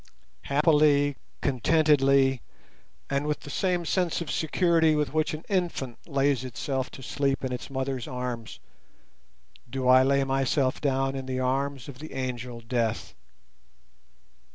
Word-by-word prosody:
Happily, 145 Hz, -1 st, +3 dB, 0.3 s
contentedly, 140 Hz, -1 st, +3 dB, 0.7 s
and 140 Hz, +1 st, -1 dB
with 150 Hz, -, -1 dB
the 145 Hz, -, -9 dB
same 180 Hz, +2 st, 0 dB
sense 180 Hz, -1 st, 0 dB
of 170 Hz, -, -4 dB
security 160 Hz, -1 st, +2 dB
with 150 Hz, -2 st, -1 dB
which 155 Hz, +1 st, 0 dB
an 155 Hz, -, -10 dB
infant 170 Hz, -, -2 dB
lays 140 Hz, -3 st, +1 dB
itself 130 Hz, +1 st, -3 dB
to 135 Hz, -, -10 dB
sleep 135 Hz, +1 st, -1 dB
in 130 Hz, -, -3 dB
its 125 Hz, -, -5 dB
mother's 130 Hz, -2 st, -3 dB
arms, 125 Hz, -3 st, -5 dB, 1.1 s
do 130 Hz, +1 st, -2 dB
I 130 Hz, 0 st, +7 dB
lay 140 Hz, +1 st, +3 dB
myself 135 Hz, 0 st, 0 dB
down 135 Hz, -1 st, 0 dB
in 135 Hz, -1 st, -5 dB
the 130 Hz, 0 st, -2 dB
arms 135 Hz, +1 st, -1 dB
of 135 Hz, -3 st, -10 dB
the 155 Hz, +1 st, -9 dB
Angel 125 Hz, -2 st, -4 dB
Death. 115 Hz, -1 st, -2 dB
135 Hz, 135 wpm, -27 LUFS, 130-150 Hz, 1.1 s, I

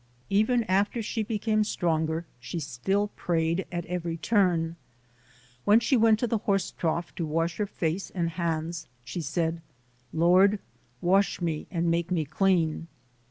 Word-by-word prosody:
Even 220 Hz, +4 st, +3 dB
after 205 Hz, +3 st, +1 dB
she 220 Hz, +1 st, -2 dB
became 215 Hz, 0 st, +1 dB
stronger 160 Hz, -4 st, 0 dB
she 125 Hz, +8 st, -5 dB
still 165 Hz, +9 st, -1 dB
prayed 170 Hz, -1 st, -1 dB
at 175 Hz, -1 st, -3 dB
every 170 Hz, -2 st, -3 dB
turn. 170 Hz, -5 st, +2 dB, 0.9 s
When 210 Hz, +2 st, +6 dB
she 250 Hz, +3 st, +2 dB
went 225 Hz, -2 st, +5 dB
to -, -, +3 dB
the 230 Hz, -2 st, 0 dB
horse 195 Hz, -2 st, 0 dB
trough 170 Hz, +1 st, -2 dB
to 170 Hz, -, -3 dB
wash 165 Hz, +2 st, -1 dB
her 210 Hz, -, -1 dB
face 170 Hz, +1 st, -2 dB
and 170 Hz, -2 st, -2 dB
hands, 165 Hz, -1 st, -2 dB, 0.2 s
she 170 Hz, -, -4 dB
said, 165 Hz, +2 st, -1 dB, 0.5 s
"Lord, 185 Hz, +5 st, +5 dB, 0.4 s
wash 195 Hz, +3 st, +3 dB
me 165 Hz, -4 st, -2 dB
and 170 Hz, -1 st, 0 dB
make 170 Hz, 0 st, 0 dB
me 170 Hz, -4 st, 0 dB
clean". 165 Hz, 0 st, +1 dB
175 Hz, 150 wpm, -27 LUFS, 165-200 Hz, 0.9 s, When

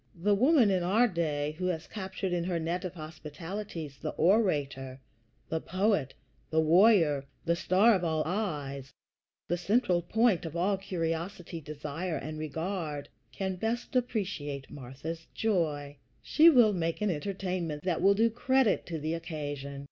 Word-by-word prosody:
The 205 Hz, +4 st, +3 dB
woman 250 Hz, 0 st, +5 dB
in 185 Hz, -2 st, +2 dB
our 210 Hz, +8 st, +3 dB
day 155 Hz, -6 st, -1 dB
who 185 Hz, -, 0 dB
has 170 Hz, -3 st, -2 dB
captured 190 Hz, -2 st, -4 dB
in 175 Hz, -1 st, 0 dB
her 175 Hz, -1 st, -1 dB
net 170 Hz, +3 st, -2 dB
of 185 Hz, 0 st, -5 dB
hospitalities 160 Hz, 0 st, -7 dB
the 155 Hz, -, -2 dB
orator, 145 Hz, -, +1 dB, 0.5 s
the 160 Hz, 0 st, -2 dB
poet, 185 Hz, -, 0 dB, 0.3 s
the 160 Hz, -, +2 dB
warrior 160 Hz, -4 st, +5 dB, 0.2 s
the 170 Hz, 0 st, +2 dB
star 190 Hz, +7 st, +4 dB
of 185 Hz, -3 st, 0 dB
all 160 Hz, -2 st, +1 dB
eyes, 145 Hz, -8 st, -3 dB, 0.6 s
the 175 Hz, -, 0 dB
central 185 Hz, -1 st, +2 dB
point 220 Hz, +1 st, +2 dB
of 165 Hz, -1 st, -6 dB
all 190 Hz, +4 st, +2 dB
curiosity, 170 Hz, -1 st, -3 dB
desire, 155 Hz, +3 st, -4 dB
and 155 Hz, 0 st, -6 dB
regard 155 Hz, -1 st, -4 dB, 0.2 s
can 190 Hz, -1 st, -3 dB
best 235 Hz, +6 st, -3 dB
appreciate 180 Hz, -, -2 dB
Martha's 145 Hz, +5 st, -7 dB
joy. 150 Hz, -9 st, -1 dB, 0.3 s
She 320 Hz, +2 st, +6 dB
will 240 Hz, -8 st, +6 dB
make 165 Hz, -2 st, -1 dB
an 210 Hz, -2 st, +2 dB
entertainment 180 Hz, -2 st, -3 dB
that 180 Hz, -3 st, 0 dB
will 200 Hz, +1 st, +5 dB
do 225 Hz, +2 st, +3 dB
credit 260 Hz, 0 st, +2 dB
to 165 Hz, -, -3 dB
the 155 Hz, +1 st, -2 dB
occasion. 145 Hz, -4 st, -5 dB
170 Hz, 150 wpm, -30 LUFS, 155-200 Hz, 0.6 s, She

